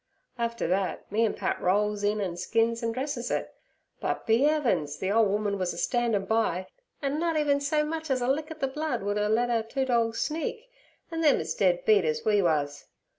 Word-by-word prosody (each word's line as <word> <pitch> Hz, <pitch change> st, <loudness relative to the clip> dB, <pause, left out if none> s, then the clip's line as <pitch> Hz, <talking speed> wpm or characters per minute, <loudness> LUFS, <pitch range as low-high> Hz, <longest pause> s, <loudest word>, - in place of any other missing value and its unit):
After 235 Hz, -5 st, -1 dB
thet 185 Hz, +2 st, -1 dB
me 220 Hz, +3 st, +2 dB
an' 215 Hz, -, -1 dB
Pat -, -, -2 dB
rolls 205 Hz, +2 st, +1 dB
in 210 Hz, +1 st, +1 dB
an' 180 Hz, -3 st, -2 dB
skins 230 Hz, +5 st, 0 dB
an' 230 Hz, -1 st, -1 dB
dresses 255 Hz, 0 st, -3 dB
it. -, -, -2 dB, 0.5 s
But, -, -, -2 dB
be 230 Hz, +5 st, +4 dB
'eavens! 190 Hz, -, +1 dB
the 190 Hz, -, -2 dB
ole 225 Hz, +1 st, +4 dB
woman 205 Hz, 0 st, -1 dB
was 180 Hz, -2 st, -1 dB
a -, -, -9 dB
standin' 235 Hz, -3 st, 0 dB
by, 195 Hz, -4 st, 0 dB, 0.4 s
an' 280 Hz, +2 st, 0 dB
nut 330 Hz, -1 st, 0 dB
even 290 Hz, -2 st, +2 dB
so 300 Hz, +1 st, +1 dB
much 320 Hz, 0 st, -4 dB
as 265 Hz, -1 st, +1 dB
a 245 Hz, -, -1 dB
lick 300 Hz, +4 st, 0 dB
at 315 Hz, -1 st, -9 dB
the 270 Hz, -, +2 dB
blood 300 Hz, -4 st, -3 dB
would 205 Hz, +1 st, -1 dB
'er 210 Hz, 0 st, +1 dB
le' 235 Hz, +3 st, +2 dB
our 235 Hz, -2 st, +1 dB
two 265 Hz, +4 st, -2 dB
dorgs 230 Hz, -3 st, +1 dB
sneak, 445 Hz, +10 st, -3 dB, 0.4 s
an' 330 Hz, 0 st, -2 dB
them 300 Hz, -3 st, +4 dB
as 160 Hz, 0 st, -3 dB
dead 180 Hz, -3 st, +1 dB
beat 210 Hz, -3 st, +5 dB
as 155 Hz, -1 st, -1 dB
we 210 Hz, -2 st, +4 dB
wuz. 150 Hz, -5 st, 0 dB
225 Hz, 220 wpm, -27 LUFS, 200-275 Hz, 0.5 s, beat